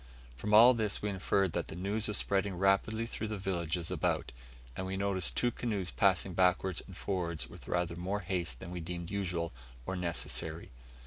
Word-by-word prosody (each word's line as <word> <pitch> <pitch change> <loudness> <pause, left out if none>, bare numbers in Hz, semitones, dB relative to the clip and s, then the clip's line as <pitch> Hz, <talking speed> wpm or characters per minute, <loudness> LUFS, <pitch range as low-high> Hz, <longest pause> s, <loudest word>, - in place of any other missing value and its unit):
From 105 +11 -4
all 115 +4 +9
this 110 -5 -1
we 105 - 0
inferred 95 -1 +1
that 85 0 -2
the - - -4
news 100 +5 -1
was 105 - +2
spreading 100 -1 0
rapidly 100 +4 +2
through 110 -1 -4
the 105 -1 -3
villages 85 -3 -1
about, - - 0 0.4
and 95 - -3
we 95 - -3
had 95 - -2
noticed 100 -3 +1
two 120 - +3
canoes 105 -9 -2
passing - - +2
backwards 90 -1 +2
and 95 - -11
forwards 85 -5 -2
with - - -13
rather 85 -1 0
more 95 +4 -2
haste 85 -8 -2
than 85 - -8
we 90 - -4
deemed 85 +1 -5
usual 90 -4 -1 0.3
or 95 - -2
necessary. 85 -2 -2
95 Hz, 190 wpm, -32 LUFS, 85-100 Hz, 0.4 s, all